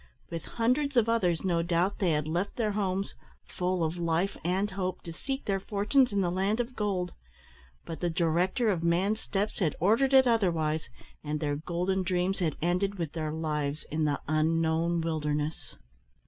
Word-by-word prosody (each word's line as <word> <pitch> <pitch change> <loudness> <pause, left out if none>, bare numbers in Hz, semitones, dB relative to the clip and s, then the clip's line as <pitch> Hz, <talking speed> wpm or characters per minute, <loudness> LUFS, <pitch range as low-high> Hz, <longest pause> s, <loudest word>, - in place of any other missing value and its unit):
With 165 -1 -5
hundreds 255 +4 +1
of 230 -2 +5
others, 180 -8 +1
no 170 -3 +2
doubt, 175 +3 0
they 185 - +2
had 150 0 0
left 175 +5 -1
their 220 -3 0
homes, 195 -1 -1 0.3
full 180 -1 -1
of 160 +2 -1
life 170 +3 0
and 190 +4 0
hope, 185 -1 -3
to 170 - -7
seek 270 +9 -4
their 195 -1 0
fortunes 210 +7 +2
in 200 -1 +1
the 175 -2 +1
land 195 +5 0
of 245 +1 -2
gold; 190 -4 -1 0.7
but 165 - -6
the 175 - 0
Director 175 +7 +1
of 175 -4 -1
man's 185 +6 +2
steps 205 0 -2
had 170 -6 +1
ordered 235 - +3
it 265 0 +8
otherwise, 165 -10 +1 0.3
and 150 0 -2
their 145 -1 -1
golden 175 +5 -1
dreams 185 +1 0
had 165 -4 -1
ended 190 +3 +1
with 165 -4 -3
their 155 -2 -2
lives 150 -2 -2
in 155 +1 +1
the 145 -1 0
unknown 165 +2 +1
wilderness. 150 -1 -2
180 Hz, 175 wpm, -29 LUFS, 160-200 Hz, 0.7 s, it